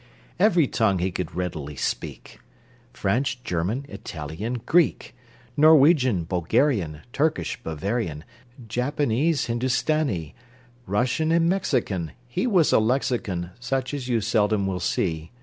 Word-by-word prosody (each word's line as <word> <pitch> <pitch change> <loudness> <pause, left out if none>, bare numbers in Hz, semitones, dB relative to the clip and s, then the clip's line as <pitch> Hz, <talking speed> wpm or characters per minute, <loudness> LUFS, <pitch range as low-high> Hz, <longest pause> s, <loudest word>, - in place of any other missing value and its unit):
Every 180 -5 +4
tongue 110 -6 +1
he 90 +2 -1
could 90 -1 -5
readily 80 -5 -4
speak: - - -4 0.5
French, 125 +4 -1
German, 95 +11 -2
Italian, 85 - -5
Greek, 170 -5 +2 0.4
Norwegian, 145 - +5
Bulgarian, 90 - 0
Turkish, 140 - 0
Bavarian, 80 0 -3 0.4
Japanese, 140 +4 0
Hindustanee, 125 - 0 0.5
Russian 125 +10 +1
and 165 0 +3
Mexican! 125 - -1
He 120 - -1
was 185 -9 +3
a - - +6
lexicon, 110 -7 -1
Such 130 +2 -2
as 135 -4 -4
you 120 -3 +1
seldom 105 -2 +1
will 95 -1 -2
see. 80 -2 -1
115 Hz, 115 wpm, -24 LUFS, 90-140 Hz, 0.5 s, a